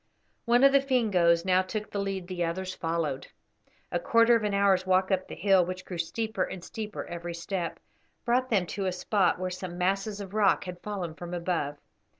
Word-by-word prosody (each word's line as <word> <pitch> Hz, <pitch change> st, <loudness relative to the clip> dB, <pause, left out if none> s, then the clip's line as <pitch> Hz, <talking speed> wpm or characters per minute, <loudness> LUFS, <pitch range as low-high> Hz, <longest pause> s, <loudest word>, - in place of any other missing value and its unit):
One 240 Hz, +2 st, +4 dB
of 275 Hz, -, +8 dB
the 275 Hz, 0 st, +5 dB
Fingoes 190 Hz, -11 st, +2 dB
now 185 Hz, 0 st, +4 dB
took 210 Hz, +3 st, -5 dB
the 200 Hz, -, -2 dB
lead; 195 Hz, -2 st, -3 dB
the 180 Hz, -2 st, -2 dB
others 185 Hz, +2 st, -3 dB
followed. 165 Hz, -6 st, -2 dB, 0.6 s
A 175 Hz, -, 0 dB
quarter 230 Hz, +6 st, +4 dB
of 230 Hz, -, +1 dB
an 205 Hz, -1 st, 0 dB
hour's 195 Hz, -2 st, +3 dB
walk 185 Hz, +1 st, +2 dB
up 185 Hz, -1 st, 0 dB
the -, -, -7 dB
hill, 195 Hz, -2 st, +4 dB
which 185 Hz, +1 st, -5 dB
grew 180 Hz, -2 st, -6 dB
steeper 220 Hz, +7 st, -2 dB
and 180 Hz, -, -3 dB
steeper 215 Hz, +1 st, -6 dB
every 170 Hz, 0 st, -6 dB
step, 170 Hz, 0 st, -4 dB, 0.5 s
brought 255 Hz, +2 st, +2 dB
them 195 Hz, -6 st, +2 dB
to 195 Hz, +2 st, -3 dB
a -, -, +1 dB
spot 185 Hz, +1 st, +1 dB
where 185 Hz, 0 st, -3 dB
some 180 Hz, -1 st, -6 dB
masses 195 Hz, +3 st, 0 dB
of 195 Hz, -1 st, -8 dB
rock 205 Hz, -2 st, +3 dB
had 180 Hz, -2 st, -8 dB
fallen 190 Hz, -6 st, -4 dB
from 175 Hz, +2 st, -6 dB
above. 170 Hz, -5 st, -2 dB
185 Hz, 200 wpm, -28 LUFS, 175-210 Hz, 0.6 s, of